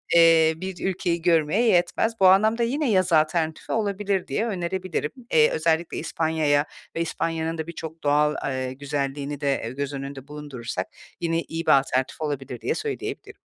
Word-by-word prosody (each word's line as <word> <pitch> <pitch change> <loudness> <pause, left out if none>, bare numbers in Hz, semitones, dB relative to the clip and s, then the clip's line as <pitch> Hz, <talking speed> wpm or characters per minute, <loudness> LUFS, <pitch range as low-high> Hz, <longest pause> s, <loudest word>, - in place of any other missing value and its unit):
eee, 165 -1 +6
bir 185 +1 -5
ülkeyi 175 -2 -1
görmeye 165 +3 +3
yetmez. 180 +3 +2
Bu 190 - +7
anlamda 215 +5 +4
yine 275 +4 0
yaz 185 -3 +2
alternatifi 160 0 +1
olabilir 200 -3 -1
diye 220 - -1
önerebilirim. 185 -5 -2 0.2
Eee, 155 -1 +6
özellikle 160 +1 0
İspanya’ya 155 -3 +1 0.3
ve 165 - -1
İspanya’nın 165 0 -2
da 160 0 -4
birçok 165 -1 -8
doğal, 150 +1 +3
eee, 130 -1 -3
güzelliğini 140 +1 -3
de 140 -1 +1
e, - - -3
göz 140 +2 -4
önünde 135 -1 -7
bulundurursak 145 -5 -5 0.3
yine 165 -1 0
iyi 165 0 -5
bir - - +4
alternatif 130 +2 -2
olabilir 135 -5 -4
diye - - -1
söyleyebilirim. - - -5
160 Hz, 155 wpm, -24 LUFS, 145-175 Hz, 0.3 s, Bu